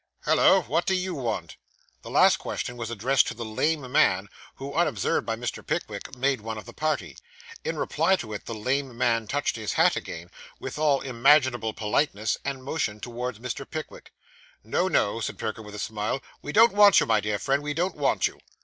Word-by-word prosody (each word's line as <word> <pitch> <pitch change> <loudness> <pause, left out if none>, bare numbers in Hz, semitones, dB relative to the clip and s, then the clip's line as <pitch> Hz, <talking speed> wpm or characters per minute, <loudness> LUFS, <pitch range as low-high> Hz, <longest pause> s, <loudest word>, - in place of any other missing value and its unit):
Hallo, - - +5
what 160 +7 -1
do 190 - +3
you 185 0 -2
want?' 120 -5 -4 0.4
This - - -10
last - - +5
question 120 - -4
was 115 -1 -5
addressed 125 +4 +2
to - - -4
the 115 +1 -6
lame 130 +4 -1
man, 95 -6 +3 0.3
who, 140 +1 -7
unobserved 150 - 0
by - - 0
Mr. - - -5
Pickwick, - - -4
made 130 -1 0
one 110 0 -5
of 105 - -8
the 120 - -11
party. 155 0 -2 0.5
In 475 - -3
reply 190 - +2
to 110 - -6
it, 105 - -7
the 115 - -4
lame 130 +3 -2
man 115 -3 +1
touched 145 -1 -1
his 110 -2 -3
hat - - +4
again, 85 +1 -7 0.3
with - - -6
all 145 -3 +3
imaginable 130 -3 +3
politeness, 105 -1 0
and 135 -2 -4
motioned 105 -7 -3
towards 120 -1 -4
Mr. 125 +3 -5
Pickwick. 155 -1 -7 0.5
'No, 145 - 0
no,' 115 - +1
said 110 - -4
Perker, 110 +1 -4
with 105 -1 -10
a - - -6
smile. 105 +4 -2 0.2
'We 145 - -5
don't 225 -1 +6
want 205 -2 +7
you, - - +2
my 110 -2 +3
dear 105 0 -1
friend, 135 +7 0
we 145 0 -3
don't 180 +4 0
want - - +1
you. - - -3
125 Hz, 200 wpm, -26 LUFS, 110-145 Hz, 0.5 s, want